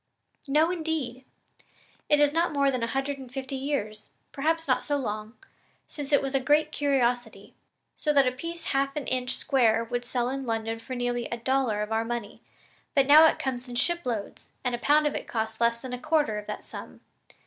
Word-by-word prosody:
"No 305 Hz, +5 st, +3 dB
indeed! 315 Hz, -7 st, -3 dB, 0.8 s
It 295 Hz, -, +5 dB
is 295 Hz, 0 st, +4 dB
not 335 Hz, +2 st, +2 dB
more 280 Hz, -2 st, +2 dB
than 255 Hz, -2 st, -2 dB
a 230 Hz, -, 0 dB
hundred 270 Hz, +3 st, -2 dB
and 260 Hz, -2 st, -10 dB
fifty 265 Hz, +1 st, -5 dB
years 240 Hz, -6 st, -3 dB, 0.2 s
perhaps 325 Hz, +3 st, 0 dB
not -, -, +2 dB
so 290 Hz, -1 st, 0 dB
long 215 Hz, -3 st, -4 dB, 0.5 s
since 290 Hz, -1 st, -7 dB
it 285 Hz, -, +4 dB
was 270 Hz, 0 st, -2 dB
a 270 Hz, -, +3 dB
great 295 Hz, +4 st, +2 dB
curiosity; 245 Hz, -8 st, 0 dB, 0.4 s
so 300 Hz, -, +1 dB
that 275 Hz, -2 st, +5 dB
a 255 Hz, -, +2 dB
piece 335 Hz, +7 st, -7 dB
half 275 Hz, 0 st, +1 dB
an 295 Hz, -3 st, -3 dB
inch 250 Hz, -1 st, -1 dB
square 230 Hz, -6 st, +2 dB
would 245 Hz, +1 st, -3 dB
sell 245 Hz, 0 st, -1 dB
in 270 Hz, +1 st, -3 dB
London 225 Hz, 0 st, -2 dB
for 255 Hz, +3 st, -6 dB
nearly 245 Hz, -1 st, -1 dB
a 235 Hz, -, -4 dB
dollar 235 Hz, -3 st, +1 dB
of 210 Hz, -, -7 dB
our 220 Hz, 0 st, +1 dB
money, 240 Hz, +1 st, -5 dB, 0.5 s
but 275 Hz, -2 st, +5 dB
now 305 Hz, +3 st, +9 dB
it -, -, +1 dB
comes 255 Hz, -1 st, -3 dB
in 245 Hz, -, -6 dB
shiploads, 245 Hz, -, -2 dB
and 250 Hz, -1 st, -1 dB
a 240 Hz, -, -2 dB
pound 300 Hz, +4 st, +4 dB
of 295 Hz, -, +1 dB
it -, -, -5 dB
costs 220 Hz, 0 st, -3 dB
less 235 Hz, +1 st, +2 dB
than 250 Hz, -1 st, -4 dB
quarter 300 Hz, -9 st, +1 dB
of 210 Hz, -, -11 dB
that -, -, -5 dB
sum. -, -, -10 dB
260 Hz, 205 wpm, -27 LUFS, 235-290 Hz, 0.8 s, now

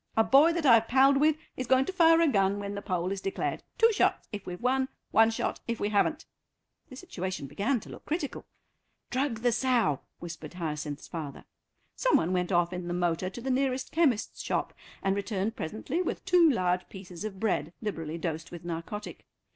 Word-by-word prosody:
A 225 Hz, -, +6 dB
boy 280 Hz, +8 st, +6 dB
that 335 Hz, -2 st, -2 dB
I've 230 Hz, -3 st, +6 dB
palled 270 Hz, +2 st, +5 dB
with 305 Hz, +2 st, +3 dB, 0.2 s
is 255 Hz, -, -4 dB
going 260 Hz, +1 st, +4 dB
to 380 Hz, -, -4 dB
fire 330 Hz, -2 st, +5 dB
a 335 Hz, -, +5 dB
gun 195 Hz, -6 st, +2 dB
when 200 Hz, 0 st, -4 dB
the 200 Hz, -, -5 dB
poll 185 Hz, -2 st, -2 dB
is 195 Hz, -1 st, -3 dB
declared; 195 Hz, -, -2 dB, 0.2 s
two 455 Hz, -1 st, +5 dB
shots -, -, +1 dB
if 205 Hz, -3 st, -7 dB
we've 180 Hz, 0 st, -5 dB
won, 260 Hz, +2 st, +1 dB, 0.2 s
one 225 Hz, +1 st, +6 dB
shot 225 Hz, -, -2 dB
if 235 Hz, -1 st, -2 dB
we 205 Hz, -, 0 dB
haven't." 210 Hz, +9 st, +1 dB, 0.6 s
The 255 Hz, -, -10 dB
situation 190 Hz, -, -5 dB
began 225 Hz, -, 0 dB
to -, -, -12 dB
look -, -, -11 dB
critical. 300 Hz, -2 st, -3 dB, 0.6 s
"Drug 255 Hz, -3 st, -1 dB
the 245 Hz, 0 st, +3 dB
sow," 235 Hz, -, +2 dB, 0.2 s
whispered 170 Hz, -1 st, -8 dB
Hyacinth's 150 Hz, -4 st, -4 dB
father. 155 Hz, -4 st, -7 dB, 0.5 s
Some -, -, +3 dB
one 175 Hz, +3 st, 0 dB
went 180 Hz, +1 st, 0 dB
off 175 Hz, 0 st, +2 dB
in 180 Hz, -1 st, -5 dB
the 175 Hz, -, -2 dB
motor 175 Hz, +1 st, 0 dB
to 240 Hz, -, -9 dB
the 265 Hz, +2 st, -2 dB
nearest 260 Hz, 0 st, 0 dB
chemist's 285 Hz, -10 st, +1 dB
shop -, -, -2 dB, 0.3 s
and 195 Hz, 0 st, +2 dB
returned 200 Hz, +1 st, -2 dB
presently 220 Hz, -, -3 dB
with 360 Hz, -, -3 dB
two 360 Hz, -3 st, +6 dB
large 180 Hz, -7 st, 0 dB
pieces 185 Hz, -2 st, -9 dB
of 205 Hz, -3 st, -5 dB
bread, 220 Hz, -5 st, 0 dB
liberally 165 Hz, -7 st, -4 dB
dosed 160 Hz, -1 st, -4 dB
with 175 Hz, -1 st, -10 dB
narcotic. 175 Hz, +5 st, -6 dB
210 Hz, 195 wpm, -29 LUFS, 180-265 Hz, 0.6 s, A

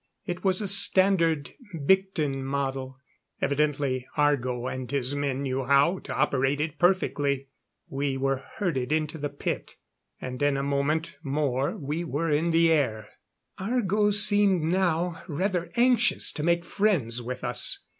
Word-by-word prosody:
It 175 Hz, +1 st, -5 dB
was 190 Hz, 0 st, +2 dB
a 205 Hz, -, -2 dB
standard 185 Hz, -6 st, +4 dB, 0.3 s
Byctin 160 Hz, -7 st, +1 dB
model 135 Hz, -1 st, -3 dB, 0.4 s
evidently 140 Hz, -3 st, -1 dB
Argo 130 Hz, -5 st, +1 dB
and 130 Hz, -1 st, -5 dB
his 140 Hz, -1 st, -1 dB
men 140 Hz, -1 st, -2 dB
knew 135 Hz, 0 st, -2 dB
how 140 Hz, +7 st, +3 dB
to -, -, -7 dB
operate 135 Hz, +1 st, +1 dB
it 155 Hz, 0 st, -3 dB
perfectly. 145 Hz, -7 st, +1 dB, 0.4 s
We 135 Hz, 0 st, -2 dB
were 135 Hz, 0 st, 0 dB, 0.2 s
herded 150 Hz, -, -2 dB
into 155 Hz, 0 st, -1 dB
the 145 Hz, 0 st, -3 dB
pit, 140 Hz, -, -5 dB, 0.4 s
and 125 Hz, +1 st, -7 dB
in 145 Hz, -1 st, +2 dB
a 135 Hz, -, -2 dB
moment 150 Hz, +4 st, -1 dB
more 140 Hz, -2 st, -1 dB
were 155 Hz, +2 st, -3 dB
in 155 Hz, +3 st, +1 dB
the 165 Hz, 0 st, +3 dB
air. 110 Hz, -9 st, 0 dB, 0.5 s
Argo 210 Hz, -1 st, +1 dB
seemed 205 Hz, -3 st, +4 dB
now 175 Hz, 0 st, 0 dB
rather 175 Hz, +1 st, -2 dB
anxious 240 Hz, -1 st, +3 dB
to -, -, -6 dB
make 170 Hz, +2 st, +1 dB
friends 145 Hz, -, 0 dB
with 125 Hz, +2 st, -6 dB
us. 120 Hz, -2 st, -1 dB
150 Hz, 140 wpm, -26 LUFS, 135-175 Hz, 0.5 s, standard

